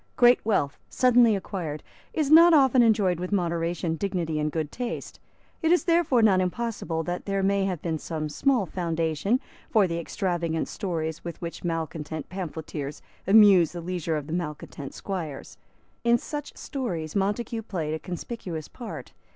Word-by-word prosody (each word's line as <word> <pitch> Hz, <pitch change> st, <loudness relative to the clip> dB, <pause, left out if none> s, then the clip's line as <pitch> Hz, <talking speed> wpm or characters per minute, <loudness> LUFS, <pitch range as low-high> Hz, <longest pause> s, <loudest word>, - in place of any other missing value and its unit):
Great 245 Hz, 0 st, +5 dB
wealth, 145 Hz, -10 st, 0 dB
suddenly 245 Hz, -3 st, +5 dB
acquired, 175 Hz, -6 st, -4 dB, 0.3 s
is 305 Hz, -3 st, 0 dB
not 335 Hz, +1 st, +9 dB
often 265 Hz, -3 st, +5 dB
enjoyed 205 Hz, -6 st, +3 dB
with 180 Hz, +2 st, -4 dB
moderation, 170 Hz, -3 st, 0 dB
dignity 170 Hz, -4 st, -2 dB
and 150 Hz, 0 st, 0 dB
good 155 Hz, -2 st, -2 dB
taste. 245 Hz, -1 st, -5 dB, 0.4 s
It 325 Hz, -1 st, +2 dB
is 355 Hz, -, +4 dB
therefore 330 Hz, -9 st, +3 dB
not 190 Hz, -4 st, +5 dB
impossible 180 Hz, -4 st, -2 dB
that 175 Hz, +2 st, -4 dB
there 195 Hz, -1 st, 0 dB
may 195 Hz, 0 st, +2 dB
have 180 Hz, -5 st, -3 dB
been 160 Hz, -2 st, -1 dB
some 155 Hz, -1 st, -4 dB
small 245 Hz, -, +1 dB
foundation 165 Hz, -, 0 dB, 0.3 s
for 215 Hz, -4 st, +4 dB
the 170 Hz, -2 st, -2 dB
extravagant 170 Hz, -3 st, -2 dB
stories 160 Hz, -5 st, -3 dB
with 170 Hz, -2 st, -6 dB
which 170 Hz, -1 st, -6 dB
malecontent 160 Hz, -2 st, -4 dB
pamphleteers 160 Hz, -5 st, -5 dB, 0.2 s
amused 195 Hz, -5 st, +7 dB
the 175 Hz, -, -5 dB
leisure 170 Hz, -2 st, -2 dB
of 145 Hz, -1 st, -6 dB
malecontent 150 Hz, -4 st, -5 dB
squires. 165 Hz, -8 st, -6 dB, 0.4 s
In 235 Hz, 0 st, +5 dB
such 295 Hz, +4 st, -6 dB
stories 175 Hz, -, -4 dB
Montague 210 Hz, +3 st, -1 dB
played 165 Hz, -8 st, -3 dB
a 160 Hz, -, -2 dB
conspicuous 175 Hz, -3 st, -6 dB
part. 240 Hz, -3 st, -8 dB
180 Hz, 150 wpm, -26 LUFS, 160-225 Hz, 0.4 s, not